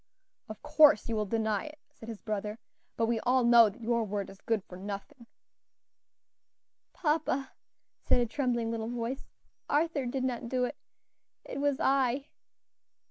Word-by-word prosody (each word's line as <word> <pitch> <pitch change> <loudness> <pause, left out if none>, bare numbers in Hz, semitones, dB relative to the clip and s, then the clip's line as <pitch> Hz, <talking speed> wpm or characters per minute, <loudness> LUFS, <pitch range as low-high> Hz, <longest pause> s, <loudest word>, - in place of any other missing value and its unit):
"Of 215 -1 -9
course 295 -5 +5
you 230 - -1
will 210 -1 -1
deny 220 -1 0
it," 305 0 -9
said 225 - -12
his 225 -3 -8
brother, 210 0 -3 0.4
"but 230 - +2
we 230 0 0
all 255 +2 +2
know 235 -2 +7
that 230 +4 -13
your 235 0 +1
word 200 -2 -3
is 195 - -16
good 225 -4 0
for 180 - -12
nothing." 205 +6 -7 1.6
"Papa," 300 -4 0 0.5
said - - +2
a 240 - +2
trembling 235 -2 -1
little 225 0 -3
voice, 240 +2 -4 0.4
"Arthur 295 -3 +1
did 255 +1 -2
not 240 -2 -2
do 255 0 +1
it; - - -5 0.7
it 270 - -5
was 285 -1 +1
I." 270 +1 +1
235 Hz, 155 wpm, -30 LUFS, 220-270 Hz, 1.6 s, know